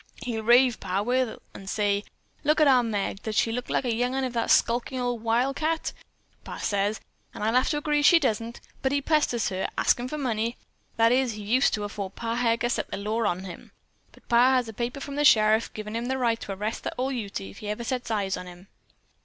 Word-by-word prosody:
He'll 230 Hz, -3 st, -3 dB
rave, 240 Hz, +1 st, +4 dB
Pa 190 Hz, +2 st, -1 dB
will, 250 Hz, 0 st, 0 dB
an' 195 Hz, -, -11 dB
say: 205 Hz, 0 st, 0 dB, 0.4 s
'Look 305 Hz, +2 st, +2 dB
at 305 Hz, -, +6 dB
our 260 Hz, -2 st, +6 dB
Meg! 205 Hz, -3 st, -2 dB
Does 220 Hz, -1 st, -4 dB
she 225 Hz, -, +2 dB
look 245 Hz, +2 st, -4 dB
like -, -, 0 dB
a 240 Hz, -, +1 dB
young 245 Hz, +3 st, 0 dB
'un 270 Hz, -, 0 dB
of 255 Hz, -2 st, -2 dB
that 230 Hz, -1 st, -1 dB
skulkin' 245 Hz, +2 st, +2 dB
old 245 Hz, -2 st, -2 dB
wildcat?' 275 Hz, +8 st, 0 dB, 0.5 s
Pa -, -, -7 dB
says, 205 Hz, +1 st, -1 dB, 0.4 s
an' -, -, -5 dB
I 220 Hz, -, +2 dB
have 255 Hz, +2 st, +3 dB
to 295 Hz, -, 0 dB
agree 295 Hz, 0 st, +1 dB
she 340 Hz, +4 st, +7 dB
don't. 230 Hz, -5 st, -1 dB, 0.2 s
But 265 Hz, +1 st, 0 dB
he 285 Hz, -, +2 dB
pesters 280 Hz, -7 st, +1 dB
her, 190 Hz, -1 st, -2 dB
askin' 245 Hz, +1 st, +2 dB
for 300 Hz, -, -5 dB
money. 235 Hz, -4 st, -1 dB, 0.4 s
That 230 Hz, 0 st, +5 dB
is, 255 Hz, -2 st, +2 dB
he 210 Hz, -1 st, -8 dB
used 250 Hz, +6 st, +2 dB
to 210 Hz, -, -4 dB
afore 205 Hz, -1 st, -4 dB
Pa 230 Hz, +4 st, -4 dB
Heger 235 Hz, 0 st, +1 dB
set -, -, -2 dB
the -, -, -4 dB
law 215 Hz, +3 st, -1 dB
on 185 Hz, -1 st, -2 dB
him. 185 Hz, -3 st, -10 dB, 0.5 s
Pa 245 Hz, +2 st, +5 dB
has 250 Hz, -2 st, +1 dB
a 225 Hz, -, -7 dB
paper 240 Hz, +5 st, -3 dB
from 280 Hz, 0 st, -6 dB
the 295 Hz, -, +2 dB
sheriff, 220 Hz, -5 st, +5 dB
givin' 215 Hz, 0 st, -6 dB
him 230 Hz, +1 st, -2 dB
the 265 Hz, +1 st, -1 dB
right 235 Hz, -3 st, +1 dB
to -, -, -7 dB
arrest 210 Hz, +4 st, -4 dB
that -, -, -3 dB
ol' 260 Hz, +2 st, -1 dB
Ute 215 Hz, -, -4 dB
if 95 Hz, 0 st, -10 dB
he 210 Hz, -, -6 dB
ever 210 Hz, +3 st, -3 dB
sets 250 Hz, 0 st, -3 dB
eyes 200 Hz, -4 st, 0 dB
on 180 Hz, -, -8 dB
him. 180 Hz, +2 st, -13 dB
230 Hz, 230 wpm, -26 LUFS, 210-255 Hz, 0.5 s, she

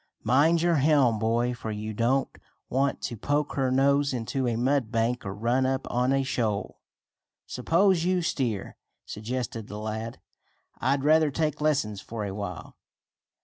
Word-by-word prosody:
"Mind 150 Hz, +8 st, +3 dB
your 170 Hz, -2 st, +3 dB
helm, 135 Hz, -6 st, +3 dB
boy, 120 Hz, +2 st, +1 dB
for 115 Hz, -2 st, -6 dB
you 110 Hz, 0 st, -4 dB
don't 125 Hz, +5 st, 0 dB, 0.3 s
want 135 Hz, +2 st, 0 dB
to 120 Hz, -, -3 dB
poke 145 Hz, +6 st, -1 dB
her 135 Hz, -2 st, 0 dB
nose 140 Hz, +2 st, +3 dB
into 125 Hz, +2 st, -2 dB
a 120 Hz, -, 0 dB
mud 125 Hz, -1 st, +1 dB
bank, 115 Hz, +1 st, 0 dB
or 95 Hz, -1 st, -5 dB
run 120 Hz, +5 st, +1 dB
up 130 Hz, 0 st, -1 dB
on 125 Hz, +2 st, +1 dB
a 135 Hz, 0 st, +2 dB
shoal." 115 Hz, -6 st, -2 dB, 0.7 s
"Suppose 170 Hz, +7 st, +2 dB
you 180 Hz, 0 st, +1 dB
steer?" 120 Hz, -, -2 dB, 0.3 s
suggested 115 Hz, 0 st, -4 dB
the 105 Hz, -, -7 dB
lad. 110 Hz, +2 st, -5 dB, 0.6 s
"I'd 135 Hz, +1 st, +1 dB
rather 155 Hz, +1 st, +4 dB
take 150 Hz, +1 st, -1 dB
lessons 135 Hz, -10 st, 0 dB
for 110 Hz, -2 st, -5 dB
a 100 Hz, -, -4 dB
while." 100 Hz, -4 st, -6 dB
125 Hz, 155 wpm, -27 LUFS, 110-140 Hz, 0.7 s, rather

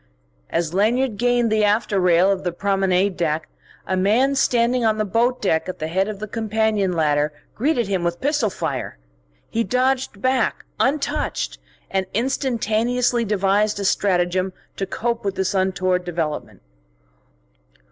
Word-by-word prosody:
As 170 Hz, -1 st, -1 dB
Lanyard 225 Hz, +4 st, +1 dB
gained 245 Hz, -1 st, +2 dB
the 215 Hz, -1 st, +2 dB
after 210 Hz, -1 st, +2 dB
rail 180 Hz, +1 st, +4 dB
of 195 Hz, -1 st, -2 dB
the 175 Hz, -, -1 dB
promenade 195 Hz, 0 st, +1 dB
deck 160 Hz, -2 st, -1 dB, 0.4 s
a 190 Hz, -, -1 dB
man 220 Hz, +9 st, +3 dB
standing 245 Hz, -2 st, +2 dB
on 220 Hz, -1 st, +2 dB
the 215 Hz, -, 0 dB
boat 235 Hz, +5 st, +1 dB
deck 160 Hz, -2 st, +1 dB
at 185 Hz, -, -5 dB
the 155 Hz, -, -3 dB
head 190 Hz, +4 st, +1 dB
of 215 Hz, -2 st, -5 dB
the 215 Hz, -, -5 dB
companion 215 Hz, -3 st, 0 dB
ladder 150 Hz, -2 st, +1 dB, 0.2 s
greeted 245 Hz, -3 st, 0 dB
him 190 Hz, -3 st, -1 dB
with 170 Hz, 0 st, -1 dB
pistol 285 Hz, -5 st, +1 dB
fire. 120 Hz, -, -4 dB, 0.5 s
He 230 Hz, -, +1 dB
dodged 255 Hz, -2 st, 0 dB
back, 255 Hz, 0 st, 0 dB
untouched, 285 Hz, +2 st, -1 dB, 0.3 s
and 190 Hz, -1 st, 0 dB
instantaneously 240 Hz, -1 st, 0 dB
devised 205 Hz, 0 st, +1 dB
a 200 Hz, -, -2 dB
stratagem 185 Hz, -1 st, +1 dB, 0.2 s
to 195 Hz, -, -2 dB
cope 235 Hz, +3 st, -2 dB
with 195 Hz, -1 st, -2 dB
this 190 Hz, 0 st, -1 dB
untoward 185 Hz, -1 st, +1 dB
development. 165 Hz, -, -4 dB
205 Hz, 145 wpm, -22 LUFS, 185-235 Hz, 0.5 s, rail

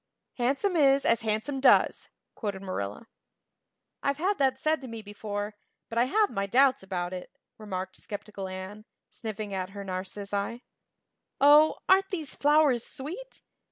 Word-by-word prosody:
"Handsome 275 Hz, +10 st, +1 dB
is 275 Hz, -3 st, +4 dB
as 230 Hz, 0 st, +3 dB
handsome 220 Hz, +6 st, -1 dB
does," 265 Hz, -, +4 dB, 0.2 s
quoted 200 Hz, -3 st, -4 dB
Marilla. 145 Hz, -, -4 dB, 1.0 s
"I've 280 Hz, 0 st, 0 dB
had 380 Hz, +4 st, 0 dB
that 265 Hz, -1 st, +2 dB
said 310 Hz, +2 st, 0 dB
to 260 Hz, -, -8 dB
me 230 Hz, -2 st, -7 dB
before, 205 Hz, 0 st, -5 dB, 0.4 s
but 230 Hz, -, -1 dB
I 240 Hz, -, +5 dB
have 420 Hz, +10 st, +2 dB
my 195 Hz, 0 st, -2 dB
doubts 260 Hz, +5 st, +4 dB
about 185 Hz, -2 st, -3 dB
it," 180 Hz, -1 st, -6 dB, 0.3 s
remarked 190 Hz, -3 st, -5 dB
skeptical 205 Hz, -1 st, -7 dB
Anne, 190 Hz, +3 st, -7 dB, 0.3 s
sniffing 215 Hz, -2 st, -6 dB
at 185 Hz, -1 st, -3 dB
her 200 Hz, 0 st, -7 dB
narcissi. 200 Hz, +4 st, -4 dB, 0.8 s
"Oh, 295 Hz, +2 st, +6 dB
aren't 385 Hz, +1 st, +5 dB
these 320 Hz, -7 st, -4 dB
flowers 290 Hz, -5 st, +3 dB
sweet! 365 Hz, -, -7 dB
225 Hz, 145 wpm, -28 LUFS, 200-280 Hz, 1.0 s, Oh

